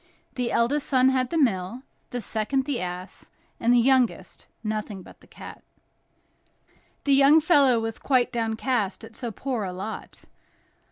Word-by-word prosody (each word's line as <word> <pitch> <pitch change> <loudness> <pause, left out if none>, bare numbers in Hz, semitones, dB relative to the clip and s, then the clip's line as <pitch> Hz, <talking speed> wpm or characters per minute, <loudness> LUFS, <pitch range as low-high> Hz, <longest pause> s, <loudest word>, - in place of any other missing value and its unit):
The 245 -2 -2
eldest 275 +5 +1
son 260 -1 +4
had 255 -1 0
the 330 - -2
mill; 230 - 0 0.3
the 245 - -4
second, 225 +6 -1
the 280 -4 -2
ass; 180 +1 -7 0.3
and 235 - +2
the 245 - +5
youngest, 255 0 +1 0.2
nothing 215 -3 -4
but - - -16
the - - -20
cat. - - -12 1.4
The 280 - +2
young 280 +3 +6
fellow 285 -7 +4
was 225 0 -4
quite 255 -3 +1
downcast 225 -2 -1
at 225 0 -12
so 240 - -5
poor 245 0 -3
a 185 - -4
lot. 195 +4 -7
240 Hz, 155 wpm, -25 LUFS, 220-265 Hz, 1.4 s, young